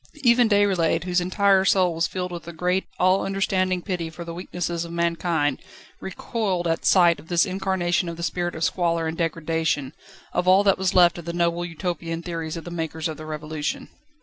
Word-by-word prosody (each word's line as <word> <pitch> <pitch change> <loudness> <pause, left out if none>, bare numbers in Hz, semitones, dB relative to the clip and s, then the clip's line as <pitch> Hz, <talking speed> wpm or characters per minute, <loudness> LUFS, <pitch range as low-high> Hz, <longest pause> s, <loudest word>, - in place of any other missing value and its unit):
Even 240 -1 +5
Déroulède, 190 -6 +2
whose 180 0 +1
entire 195 +1 +3
soul 185 -3 +3
was 165 +1 0
filled 180 -1 -4
with 170 -1 -7
a 170 - -7
great, 180 +3 0
all 185 +1 +3
understanding 185 -2 0
pity 175 -5 -3
for 170 +2 -9
the 170 - -6
weaknesses 175 -1 -3
of 170 - -8
mankind, 170 -4 0 0.4
recoiled 190 -2 -3
at 165 -1 -1
sight 175 -3 +5
of - - -15
this 170 -1 +3
incarnation 185 -2 -1
of 165 - -7
the 170 - -6
spirit 175 0 -2
of 160 - -3
squalor 170 -2 0
and 160 0 -2
degradation, 160 -4 -1 0.4
of 180 - 0
all 190 +2 +6
that 195 -2 +3
was 190 -1 0
left 175 -1 +5
of 170 - -10
the 170 - -4
noble 170 0 0
Utopian 170 -1 -4
theories 165 -2 -4
of 165 - -7
the 175 - -8
makers 160 -1 -3
of 155 -2 -6
the 155 - -9
Revolution. 155 0 -4
175 Hz, 200 wpm, -24 LUFS, 165-185 Hz, 0.4 s, all